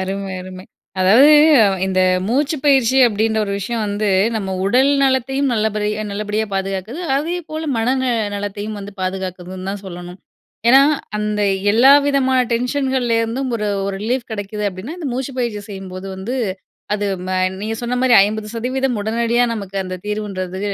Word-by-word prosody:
அருமை 195 Hz, 0 st, -4 dB
அருமை. 185 Hz, 0 st, -9 dB, 0.4 s
அதாவது 235 Hz, +11 st, +6 dB, 0.5 s
இந்த 185 Hz, -1 st, +1 dB, 0.3 s
மூச்சுப்பயிற்சி 270 Hz, 0 st, +2 dB
அப்டின்ற 220 Hz, 0 st, 0 dB
ஒரு 200 Hz, -, -3 dB
விஷயம் 225 Hz, +3 st, -3 dB
வந்து, 205 Hz, +1 st, -1 dB, 0.3 s
நம்ம 195 Hz, -3 st, -3 dB, 0.2 s
உடல் 255 Hz, +7 st, +4 dB
நலத்தையும் 270 Hz, +1 st, +1 dB
நல்லபடி 215 Hz, -2 st, 0 dB, 0.2 s
நல்லபடியா 210 Hz, +1 st, -2 dB
பாதுகாக்குது, 195 Hz, -, -3 dB, 0.2 s
அதே 330 Hz, +5 st, -1 dB
போல 315 Hz, +1 st, -4 dB
மன 225 Hz, +1 st, 0 dB
ந -, -, 0 dB, 0.3 s
நலத்தையும் 205 Hz, +1 st, -5 dB
வந்து 200 Hz, 0 st, -8 dB
பாதுகாக்குதுன்னு 185 Hz, 0 st, -5 dB
தான் 200 Hz, 0 st, -6 dB
சொல்லணும். 175 Hz, 0 st, -9 dB, 0.5 s
ஏனா 265 Hz, +3 st, +8 dB, 0.4 s
அந்த 210 Hz, 0 st, -2 dB, 0.3 s
எல்லா 245 Hz, +5 st, +6 dB, 0.2 s
விதமான 265 Hz, -2 st, +2 dB
டென்ஷன்கள்லேருந்தும் 250 Hz, -1 st, 0 dB
ஒரு 210 Hz, -, -3 dB, 0.2 s
ஒரு 195 Hz, -1 st, -3 dB
ரிலீப் 240 Hz, +3 st, -2 dB
கெடைக்குது 210 Hz, 0 st, -4 dB
அப்டின்னா, 200 Hz, -, -8 dB
இந்த 300 Hz, -6 st, -4 dB
மூச்சுப்பயிற்சி 245 Hz, -5 st, -3 dB
செய்யும் 195 Hz, -2 st, -8 dB
போது 185 Hz, +1 st, -7 dB
வந்து 225 Hz, +8 st, -4 dB, 0.6 s
அது 205 Hz, -, -2 dB, 0.2 s
ம -, -, -4 dB, 0.3 s
நீங்க 220 Hz, +2 st, -3 dB
சொன்ன 240 Hz, +1 st, -2 dB
மாரி 255 Hz, -1 st, +4 dB
50% 230 Hz, +4 st, -2 dB
உடனடியா 235 Hz, +3 st, +1 dB
நமக்கு 200 Hz, -3 st, -7 dB
அந்த 185 Hz, 0 st, -5 dB
தீர்வுன்றது 195 Hz, -3 st, -4 dB
215 Hz, 140 wpm, -19 LUFS, 195-255 Hz, 0.6 s, ஏனா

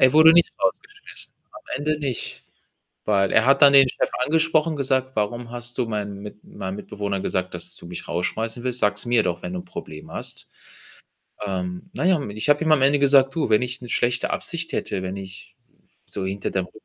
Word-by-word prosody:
Er 130 Hz, -1 st, +6 dB
wurde 160 Hz, +1 st, +8 dB
nicht 170 Hz, 0 st, +4 dB
rausgeschmissen 415 Hz, 0 st, -3 dB, 0.2 s
am 315 Hz, -, -12 dB, 0.2 s
Ende 150 Hz, +2 st, -1 dB
nicht. 135 Hz, -5 st, -5 dB, 0.6 s
Weil 100 Hz, -2 st, +2 dB
er 110 Hz, -, +4 dB
hat 135 Hz, +1 st, +4 dB
dann 140 Hz, -1 st, +9 dB
den 135 Hz, -1 st, +7 dB
Chef -, -, -1 dB
angesprochen, 160 Hz, +1 st, +2 dB
gesagt: 130 Hz, -1 st, 0 dB
„Warum 115 Hz, +3 st, -2 dB
hast 120 Hz, +1 st, -3 dB
du 125 Hz, -, +1 dB
meinem 105 Hz, -2 st, -4 dB
Mit 105 Hz, 0 st, -10 dB
meinem 95 Hz, 0 st, -6 dB
Mitbewohner 100 Hz, -1 st, -4 dB
gesagt, 95 Hz, -1 st, -2 dB
dass -, -, -1 dB
du -, -, -11 dB
mich 90 Hz, 0 st, -7 dB
rausschmeißen 110 Hz, +7 st, -2 dB
willst? 125 Hz, -1 st, +4 dB
Sag's 105 Hz, +2 st, +1 dB
mir 120 Hz, -2 st, +3 dB
doch, 85 Hz, -2 st, -2 dB
wenn -, -, -5 dB
du 180 Hz, -, -3 dB
'n -, -, -12 dB
Problem 80 Hz, -, -9 dB
hast." -, -, -4 dB, 1.0 s
Ähm, 90 Hz, -, -4 dB
na -, -, -2 dB
ja, 185 Hz, 0 st, +5 dB
und 140 Hz, -, -5 dB
ich 110 Hz, +5 st, -2 dB
habe 145 Hz, +2 st, +4 dB
ihm 160 Hz, -, +2 dB
am 150 Hz, -3 st, +5 dB
Ende 140 Hz, +2 st, +4 dB
gesagt: 135 Hz, -1 st, +4 dB
„Du, 160 Hz, -7 st, 0 dB
wenn 110 Hz, +1 st, +4 dB
ich 125 Hz, +1 st, -4 dB
'ne 120 Hz, -, -9 dB
schlechte 120 Hz, 0 st, +1 dB
Absicht 170 Hz, 0 st, -3 dB
hätte, 95 Hz, -, -2 dB
wenn 95 Hz, +1 st, -4 dB
ich 95 Hz, -1 st, -10 dB, 0.5 s
so 95 Hz, -, -5 dB
hinter 95 Hz, +1 st, -3 dB
deinem 95 Hz, -2 st, -1 dB
Rücken 110 Hz, -, -18 dB
120 Hz, 210 wpm, -23 LUFS, 100-145 Hz, 1.0 s, dann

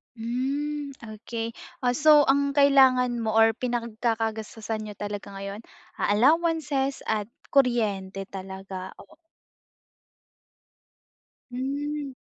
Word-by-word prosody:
Hmm, 275 Hz, +5 st, -2 dB
okey. 225 Hz, +1 st, -6 dB, 0.2 s
Oh, 250 Hz, -1 st, +1 dB
so 300 Hz, 0 st, +6 dB
ang 280 Hz, +1 st, +3 dB
kailangan 265 Hz, -3 st, +5 dB
mo 220 Hz, -, 0 dB
or 225 Hz, 0 st, +4 dB
pinagkakagastusan 225 Hz, -2 st, -2 dB
niyo 210 Hz, -1 st, -7 dB
talaga 205 Hz, -1 st, -5 dB
ngayon, 200 Hz, +2 st, -7 dB, 0.3 s
ah, -, -, 0 dB
allowances 280 Hz, +2 st, +2 dB
at 215 Hz, 0 st, -1 dB, 0.2 s
kuryente 205 Hz, -7 st, +1 dB
talaga, 190 Hz, -1 st, -7 dB
oo. 320 Hz, -, -15 dB, 2.4 s
Hmm. 280 Hz, +2 st, -3 dB
235 Hz, 95 wpm, -26 LUFS, 215-275 Hz, 2.4 s, so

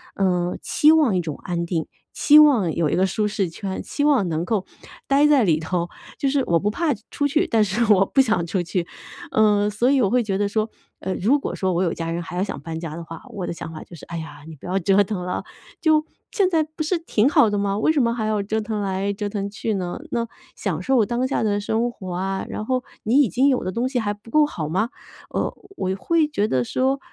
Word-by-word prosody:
呃， 180 Hz, -2 st, 0 dB
期 305 Hz, +1 st, +4 dB
望 290 Hz, -12 st, +3 dB
一 -, -, +2 dB
种 160 Hz, -5 st, -4 dB
安 170 Hz, -2 st, -2 dB
定， 170 Hz, -2 st, -2 dB, 0.3 s
期 300 Hz, 0 st, +6 dB
望 245 Hz, -, +5 dB
有 165 Hz, -3 st, +1 dB
一 -, -, 0 dB
个 190 Hz, -, +3 dB
舒 210 Hz, +3 st, 0 dB
适 200 Hz, -4 st, -1 dB
圈， 190 Hz, +3 st, -5 dB
期 290 Hz, -, -2 dB
望 265 Hz, -12 st, +3 dB
能 160 Hz, +1 st, -1 dB
够 205 Hz, -2 st, -1 dB, 0.4 s
呆 280 Hz, +2 st, +4 dB
在 290 Hz, -4 st, +5 dB
里 160 Hz, -6 st, +2 dB
头。 170 Hz, +2 st, -2 dB, 0.3 s
就 275 Hz, -, 0 dB
是 280 Hz, 0 st, +2 dB
我 170 Hz, -, +3 dB
不 205 Hz, +5 st, 0 dB
怕 320 Hz, +5 st, 0 dB, 0.2 s
出 285 Hz, -, 0 dB
去， 300 Hz, +3 st, +2 dB
但 225 Hz, -1 st, +2 dB
是 210 Hz, +3 st, +1 dB
我 195 Hz, 0 st, +4 dB
不 270 Hz, -, +3 dB
想 220 Hz, -9 st, +1 dB
出 180 Hz, +1 st, -1 dB
去。 175 Hz, 0 st, -2 dB, 0.4 s
嗯， 210 Hz, -1 st, +3 dB
所 235 Hz, +5 st, +1 dB
以 275 Hz, -2 st, +3 dB
我 200 Hz, -, +3 dB
会 245 Hz, +1 st, +2 dB
觉 195 Hz, -2 st, -1 dB
得 205 Hz, -, +1 dB
说， 215 Hz, +2 st, -1 dB, 0.3 s
呃， 190 Hz, -, -2 dB
如 250 Hz, +10 st, +3 dB
果 -, -, -4 dB
说 185 Hz, -1 st, -1 dB
我 175 Hz, -, +1 dB
有 170 Hz, -, 0 dB
家 165 Hz, 0 st, -4 dB
人 170 Hz, +1 st, -3 dB
还 175 Hz, -, -7 dB
要 185 Hz, -, +1 dB
想 -, -, -5 dB
搬 165 Hz, -1 st, -5 dB
家 165 Hz, -2 st, -6 dB
的 170 Hz, -, -6 dB
话， 165 Hz, -1 st, -9 dB
我 190 Hz, -3 st, -4 dB
的 -, -, -3 dB
想 165 Hz, -1 st, -7 dB
法 155 Hz, -, -8 dB
就 -, -, -17 dB
是， 165 Hz, -, -11 dB
哎 170 Hz, -, -8 dB
呀， 160 Hz, -2 st, -9 dB
你 160 Hz, -, -9 dB
不 140 Hz, -, -15 dB
要 185 Hz, +2 st, 0 dB
折 195 Hz, +3 st, +4 dB
腾 200 Hz, -1 st, -4 dB
了。 180 Hz, -, -3 dB, 0.4 s
就 310 Hz, -2 st, +3 dB, 0.3 s
现 390 Hz, -3 st, +2 dB
在 325 Hz, -3 st, +2 dB
不 310 Hz, +1 st, -9 dB
是 315 Hz, +4 st, +1 dB
挺 270 Hz, -7 st, +1 dB
好 285 Hz, -, +5 dB
的 205 Hz, -, -1 dB
吗？ 200 Hz, 0 st, 0 dB
为 220 Hz, -, +3 dB
什 300 Hz, -3 st, +2 dB
么 235 Hz, -1 st, +2 dB
还 225 Hz, -2 st, -2 dB
要 215 Hz, -1 st, 0 dB
折 215 Hz, +2 st, -1 dB
腾 215 Hz, -1 st, -3 dB
来 195 Hz, 0 st, -1 dB
折 205 Hz, +1 st, -3 dB
腾 200 Hz, -1 st, -3 dB
去 215 Hz, +1 st, -2 dB
呢？ 180 Hz, -2 st, -3 dB
那 235 Hz, -1 st, -1 dB, 0.3 s
享 180 Hz, -5 st, -3 dB
受 240 Hz, +2 st, +3 dB
当 240 Hz, +3 st, -1 dB
下 265 Hz, -, -1 dB
的 205 Hz, -1 st, +1 dB
生 225 Hz, +3 st, 0 dB
活 185 Hz, -5 st, -8 dB
啊， 190 Hz, +2 st, -2 dB
然 215 Hz, -, -4 dB
后 255 Hz, +1 st, 0 dB, 0.2 s
你 250 Hz, +7 st, +4 dB
已 260 Hz, -, +2 dB
经 260 Hz, -, +3 dB
有 255 Hz, -, +1 dB
的 185 Hz, -, -2 dB
东 235 Hz, +5 st, -1 dB
西 255 Hz, -2 st, -1 dB
还 205 Hz, -2 st, -1 dB
不 215 Hz, +2 st, -16 dB
够 305 Hz, +3 st, +5 dB
好 165 Hz, -, -4 dB
吗？ 195 Hz, +9 st, 0 dB, 0.4 s
呃， -, -, -2 dB, 0.2 s
我 185 Hz, 0 st, -1 dB
会 320 Hz, -, +1 dB
觉 215 Hz, -8 st, 0 dB
得 130 Hz, -, +1 dB
说， 265 Hz, -, 0 dB
205 Hz, 275 characters per minute, -22 LUFS, 180-255 Hz, 0.4 s, 期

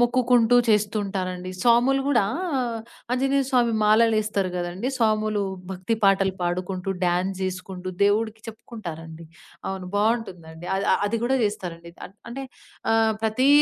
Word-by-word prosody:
మొక్కుకుంటూ 245 Hz, -1 st, +4 dB
చేస్తూ 210 Hz, 0 st, +2 dB
ఉంటారండి. 185 Hz, -2 st, -4 dB
స్వాములు 245 Hz, +3 st, +4 dB
గూడా 240 Hz, -8 st, +3 dB, 0.9 s
ఆంజనేయ 270 Hz, +2 st, +2 dB
స్వామి 240 Hz, -3 st, +3 dB
మాలలు 220 Hz, +1 st, +5 dB
ఎస్తరు 200 Hz, -3 st, -1 dB
గదండీ! 175 Hz, +7 st, -3 dB
స్వాములు 215 Hz, -2 st, +1 dB, 0.3 s
భక్తి 190 Hz, +4 st, -2 dB
పాటలు 195 Hz, -1 st, +3 dB
పాడుకుంటూ 180 Hz, +2 st, -2 dB, 0.2 s
డాన్స్ 180 Hz, +2 st, 0 dB
జేసుకుంటూ 185 Hz, 0 st, -4 dB
దేవుడికి 220 Hz, +2 st, +2 dB
చెప్పుకుంటారండి. 170 Hz, -8 st, -8 dB, 0.5 s
అవును. 190 Hz, -1 st, -5 dB
బావుంటుందండి. 185 Hz, -7 st, -1 dB
అ -, -, +1 dB, 0.3 s
అది 230 Hz, +3 st, 0 dB
కూడా 265 Hz, +2 st, +2 dB
జేస్తారండి. 170 Hz, -5 st, -4 dB
ఆహ్, 195 Hz, -, -20 dB, 0.2 s
అంటే 270 Hz, +3 st, -5 dB, 0.5 s
ఆహ్, 225 Hz, 0 st, +3 dB
ప్రతి 225 Hz, +5 st, +2 dB
210 Hz, 125 wpm, -24 LUFS, 185-230 Hz, 0.9 s, మాలలు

